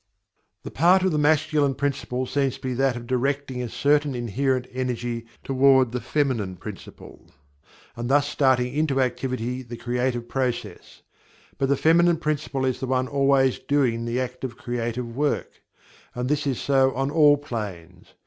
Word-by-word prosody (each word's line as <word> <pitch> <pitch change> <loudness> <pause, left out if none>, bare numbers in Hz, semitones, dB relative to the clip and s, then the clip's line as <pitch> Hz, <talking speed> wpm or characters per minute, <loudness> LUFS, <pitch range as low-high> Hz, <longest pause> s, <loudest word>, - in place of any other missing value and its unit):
The - - -7
part 180 +5 +4
of 190 - +2
the 150 - 0
Masculine 150 -2 +2
principle 135 -2 -2
seems 135 0 0
to - - -15
be 130 -1 -2
that 135 0 +1
of 120 -1 -7
directing 130 +1 -1
a 120 - -4
certain 145 +2 +1
inherent 125 +2 -1
energy 120 -2 -3 0.2
toward 130 -2 +4
the 125 0 -3
Feminine 125 -11 -1
principle, - - -11 0.7
and 120 +1 -4
thus 145 +1 +3
starting 130 -3 +2
into 145 -2 0
activity 125 -1 -2
the 120 -1 -9
creative 120 0 -2
processes. 130 -1 -4 0.6
But 135 - +1
the 140 - +3
Feminine 170 +2 +4
principle 150 -4 -2
is 130 -1 -1
the 130 - -3
one 130 0 0
always 135 -2 +2
doing 125 -5 0
the 120 +2 -1
active 125 -1 -5
creative 120 0 -4
work 145 +1 -2 0.5
and 125 +1 -2
this 150 0 0
is 130 -3 -1
so 135 -1 +2
on 135 +2 -1
all 150 -2 +5
planes. 100 - -7
130 Hz, 160 wpm, -24 LUFS, 120-140 Hz, 0.7 s, all